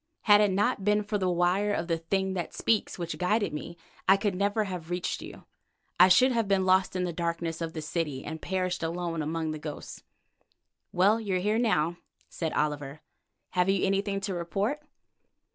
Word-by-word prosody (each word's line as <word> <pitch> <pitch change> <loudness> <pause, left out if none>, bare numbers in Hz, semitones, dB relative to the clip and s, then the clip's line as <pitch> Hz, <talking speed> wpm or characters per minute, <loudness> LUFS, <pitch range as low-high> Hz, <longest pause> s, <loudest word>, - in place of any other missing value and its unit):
Had 205 -1 +6
it 210 - +4
not 205 +2 +1
been 210 +1 +2
for 210 0 -2
the 185 -1 +1
wire 180 +4 +2
of 175 - -1
the 165 -2 0
'thing 190 +3 -1
that 175 -3 -4
speaks' 220 -2 0
which 170 -2 -5
guided 205 +1 +1
me, 170 +3 -6 0.3
I 195 - +7
could 200 -1 -1
never 205 +3 +1
have 180 -5 -6
reached 175 0 -2
you. - - -10 0.6
I 180 - +9
should 250 +8 +5
have 230 -3 0
been 195 -1 +2
lost 185 0 +3
in 185 - 0
the 175 -1 -2
darkness 170 0 -3
of 165 -1 -3
the 155 - -5
city 150 -4 -3
and 160 +1 -6
perished 185 -1 -2
alone 165 0 -2
among 160 +1 -2
the 155 - -5
ghosts." 150 -1 -7 0.9
"Well, 200 +5 +3
you 200 -4 -2
are - - +1
here 210 +4 +1
now," 175 -8 +1 0.3
said 160 -2 -3
Oliver. 150 -1 -2 0.5
"Have 180 +1 +2
you 195 -1 +2
anything 195 +1 0
to 195 -1 -3
report?" 195 - -2
180 Hz, 195 wpm, -28 LUFS, 165-200 Hz, 0.9 s, I